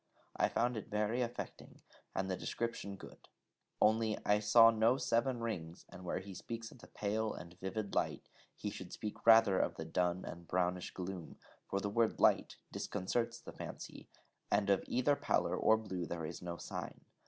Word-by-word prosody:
I - - +2
found 120 0 +1
it 110 - -5
very 105 +3 0
affecting, 120 -1 -5 0.3
and 95 - 0
the 95 - -1
description 115 -1 -3
good, - - -13 0.5
only 110 0 +3
I 105 0 +4
saw 115 +2 +7
no 115 +3 +3
seven 120 -1 +1
rings, 90 -7 -4
and 90 - -11
where 90 - -2
he 95 +1 -7
speaks 115 +4 -6
of - - -15
the - - -13
'pale 105 +1 -1
and 85 0 -10
livid 100 +2 -3
light,' - - -1 0.3
he 105 - -3
should 95 -3 -8
speak 105 +1 -6
rather 110 -4 +7
of - - +1
the 80 - -5
dun 90 +2 0
and 85 0 -8
brownish 90 0 0
gloom, 90 -2 -6 0.3
for 100 - 0
the 100 - -2
word 115 +2 +1
'light' - - +4
disconcerts 115 +5 -2
the - - -10
fancy, - - -8 0.4
and 100 -1 +3
of 100 - +3
either 130 +3 +3
pallor - - +1
or 110 - +5
blue 95 -6 -4
there 85 -1 -4
is 80 - -5
there 90 - -7
no 85 - -5
sign. - - -6
105 Hz, 185 wpm, -35 LUFS, 90-115 Hz, 0.5 s, saw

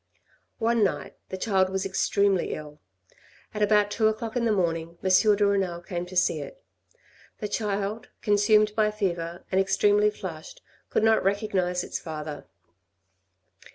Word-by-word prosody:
" - - -38
One 230 -1 +2
night 195 - -2
the 190 - -5
child 190 -2 +1
was 190 0 -2
extremely 195 0 +1
ill. 150 0 -10 0.7
At 210 - -4
about 210 0 +3
two 220 0 +2
o'clock 220 +1 -2
in 240 -1 +1
the 225 - +2
morning, 170 -3 -1
M. 190 +3 +5
de 205 0 +2
Renal 195 -4 0
came 175 0 -5
to 185 - -10
see 180 - +2
it. - - -10 0.7
The 210 - -4
child 205 0 -3
consumed 210 +1 +3
by 215 -1 +3
fever, 175 -5 -3
and 190 0 +3
extremely 205 +2 +3
flushed, 170 -6 -8 0.3
could - - +1
not 220 0 +4
recognise 190 -3 0
its - - -4
father. 155 -2 -7
200 Hz, 155 wpm, -26 LUFS, 180-210 Hz, 0.7 s, M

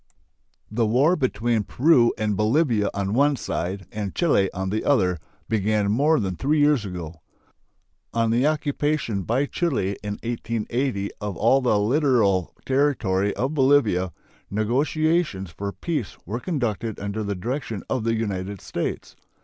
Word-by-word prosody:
The 115 +1 +1
war 135 +10 +4
between 120 - 0
Peru 120 - +4
and 105 -1 0
Bolivia 110 - +2
on 100 0 -2
the 100 - -2
one 140 +4 +3
side 95 -5 -3
and 105 -2 -4
Chile 125 - +2
on 95 0 -3
the 110 - -1
other 90 - +2 0.3
began 105 -1 +1
more 150 +7 +3
than 95 -3 -2
three 145 - +1
years 145 -5 +4
ago. 85 -4 -7 0.9
On 115 -1 +1
the 125 +5 +3
occupation 150 -7 0
by 120 +9 0
Chile 135 - -1
in 105 0 -3
1880 115 -1 -2
of 105 -4 -4
all 130 +7 +4
the 120 -5 +2
littoral 110 - +2
territory 110 -8 +1
of 130 +4 -1
Bolivia, 130 - +3 0.4
negotiations 130 - 0
for 100 +4 -4
peace 150 - -4
were 110 +7 -3
conducted 120 - -2
under 100 +2 -3
the 100 -1 -2
direction 115 +1 -4
of 130 -4 -1
the 115 0 +1
United 100 -3 -3
States. - - -4
115 Hz, 145 wpm, -24 LUFS, 100-140 Hz, 0.9 s, war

